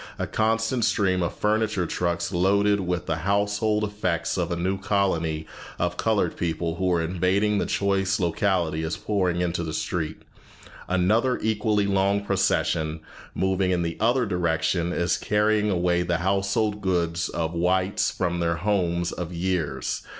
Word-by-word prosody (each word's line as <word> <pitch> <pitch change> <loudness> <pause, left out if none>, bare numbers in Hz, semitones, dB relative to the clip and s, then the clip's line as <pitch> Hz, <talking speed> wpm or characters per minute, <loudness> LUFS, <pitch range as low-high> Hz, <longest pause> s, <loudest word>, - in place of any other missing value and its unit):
A - - -2
constant 115 +2 0
stream 100 -4 +2
of 85 - -2
furniture 105 -3 +1
trucks 85 +1 -1
loaded 100 +3 +2
with 90 -2 -2
the 80 -2 -1
household 105 +4 +1
effects 90 -6 -1
of 90 -2 -1
a - - 0
new 95 +3 -1
colony 90 -6 0 0.3
of 90 0 -1
colored 110 +2 0
people 85 -1 -2
who 95 0 +1
are 85 -2 +2
invading 95 +5 +1
the - - -1
choice 100 -1 +1
locality 85 -2 0
is 80 +1 -3
pouring 90 -4 0
into 85 -1 -1
the 80 -2 -4
street. 80 -3 -3 0.6
Another 110 +8 +2
equally 105 -1 +1
long 100 +1 +1
procession, 80 -5 0 0.3
moving 95 0 +1
in 90 -1 +1
the 85 0 -3
other 120 +3 +2
direction, 85 -2 0
is 85 0 0
carrying 105 0 +1
away 90 -2 +1
the 90 -1 0
household 100 +3 0
goods 85 -3 0
of 80 -1 -2
the 85 - -4
whites 95 +2 +1
from 85 -1 -2
their 85 0 +1
homes 85 -2 0
of 90 -1 -5
years." 85 -7 -2
95 Hz, 155 wpm, -25 LUFS, 85-100 Hz, 0.6 s, stream